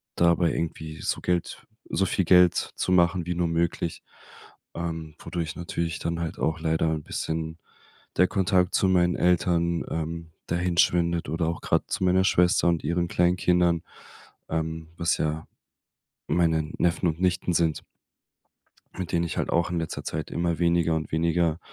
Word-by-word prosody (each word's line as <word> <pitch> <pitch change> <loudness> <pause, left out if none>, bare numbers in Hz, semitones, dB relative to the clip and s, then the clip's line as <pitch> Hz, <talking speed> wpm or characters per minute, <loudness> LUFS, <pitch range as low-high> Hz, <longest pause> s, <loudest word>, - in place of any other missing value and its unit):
dabei 85 -1 +3
irgendwie 80 -1 -4
so - - -2
Geld 90 -1 -2 0.3
so 95 - +2
viel 95 +1 0
Geld 90 0 +6 0.2
zu - - -1
machen 90 -1 +3
wie 90 - -1
nur 85 -1 +1
möglich, 85 0 -1 0.7
ähm, 80 -2 -5
wodurch 80 -3 -4
natürlich 85 -1 -3
dann 85 0 -2
halt 80 - -4
auch 80 +1 0
leider 80 0 +1
'n 80 -2 -3
bisschen 80 +1 -4 0.6
der 90 - +4
Kontakt 95 -2 +1
zu 95 - +3
meinen 90 -1 +3
Eltern 85 -1 +1
ähm, 80 +1 -4 0.2
dahinschwindet 85 -1 +1
oder 80 +1 0
auch 85 - -3
gerade - - +1
zu - - -1
meiner 95 +1 +3
Schwester 90 -1 +3
und 85 -1 0
ihren 85 +1 0
kleinen 90 +1 +2
Kindern, 90 -2 +2 0.7
ähm, 80 0 -3
was 85 -1 +1
ja 80 +1 -2 0.8
meine 80 -3 +1
Neffen 85 +1 +1
und 80 +1 -3
Nichten 90 -1 +1
sind 80 -2 +1 1.2
mit 90 -3 -4
denen 85 0 +1
ich 85 - -5
halt - - -1
auch 85 +1 +1
in 85 - -1
letzter 80 - -4
Zeit 80 -1 -4
immer 85 -1 -1
weniger 85 -1 +2
und 80 0 -4
weniger, 85 0 +1
85 Hz, 160 wpm, -26 LUFS, 80-90 Hz, 1.2 s, Geld